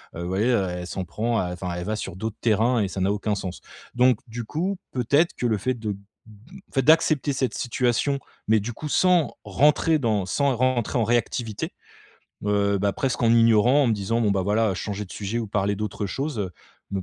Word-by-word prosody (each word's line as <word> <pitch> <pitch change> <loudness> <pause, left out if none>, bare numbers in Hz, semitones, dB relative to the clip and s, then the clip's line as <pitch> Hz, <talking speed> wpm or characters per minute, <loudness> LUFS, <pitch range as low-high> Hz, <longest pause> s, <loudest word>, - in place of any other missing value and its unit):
heu, 85 - -5
vous 85 - -4
voyez, 95 +4 0
heu, 100 -6 +2
elle 90 0 -5
s'en 95 - -4
prend 115 +6 -1
à 90 -1 -2
enfin 90 0 -4
elle 90 - -4
va 110 - -1
sur 95 -4 -5
d'autres 110 +2 -5
terrains 115 +2 +2
et 100 - +1
ça 95 0 -5
n'a 95 +2 +2
aucun 105 +1 -1
sens. 95 -2 -5 0.4
Donc 125 -2 +4
du 120 +1 -5
coup 180 - -2
peut-être 140 +7 +2
que - - -3
le 110 -2 +1
fait 130 +6 -1
de 110 -3 -4
b - - -10 0.7
le - - -29
fait 135 - +2
d'accepter 155 0 +3
cette 130 -2 -1
situation, 125 +3 0 0.3
mais 110 0 +5
du 115 +4 -5
coup 150 +6 -6
sans 180 -1 +3
rentrer 150 +2 +3
dans 110 -8 0
sans 140 +9 +1
rentrer 130 0 +1
en 115 - +2
réactivité, 115 -1 -1 0.8
heu, 100 -1 +2
bah, 100 +1 +1
presque 130 -2 -1
en 115 - +4
ignorant, 115 +4 +5
en - - +2
me - - +3
disant 110 +3 -1
bon, 105 - +2
bah, 100 -1 +1
voilà 105 +2 +1
changer 105 +3 -4
de 90 - -12
sujet 105 +3 -3
ou 115 - -3
parler 100 0 0
d'autre 105 0 -3
chose, 135 +5 -3
heu, 95 -3 -2 0.4
me 100 -1 -2
110 Hz, 220 wpm, -24 LUFS, 100-130 Hz, 0.8 s, mais